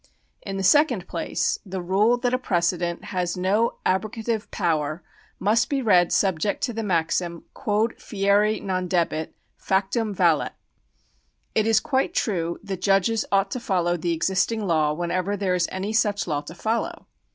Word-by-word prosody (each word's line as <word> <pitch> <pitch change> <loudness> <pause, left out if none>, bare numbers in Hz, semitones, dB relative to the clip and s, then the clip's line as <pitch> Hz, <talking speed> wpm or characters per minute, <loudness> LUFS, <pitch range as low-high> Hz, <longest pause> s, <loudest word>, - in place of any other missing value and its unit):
In 195 -1 -5
the 195 - -2
second 250 - +3
place, - - -1
the 190 -2 -5
rule 200 +7 +2
that 245 0 -1
a 255 - +2
precedent 175 -4 -1
has 180 -1 -1
no 200 +6 +1
abro 190 +4 +1
gative 225 0 -3
power 160 -3 -1 0.4
must 220 +4 +2
be 280 - 0
read 185 -8 +4
subject 190 0 +1
to 245 - 0
the 225 - -3
maxim. 170 -3 -1
Quod 215 +3 -1
fieri 205 +1 +2
non 185 -2 -2
debet, 165 -3 0 0.2
factum 200 +3 0
valet. 175 -6 +2 1.0
It 220 0 +2
is 225 -1 +5
quite 270 +8 -1
true 170 -5 -1
that 195 -3 -5
judges 200 +3 +2
ought 195 0 +2
to 255 - -2
follow 180 -7 0
the 170 0 -2
existing 190 +6 0
law 155 -4 +2
whenever 180 +5 -1
there 190 -2 0
is 175 -2 +1
any 195 +3 -3
such 210 -3 +1
law 150 -4 -1
to 150 +3 -10
f - - -18
oUow. 225 +1 -1
195 Hz, 165 wpm, -24 LUFS, 175-220 Hz, 1.0 s, is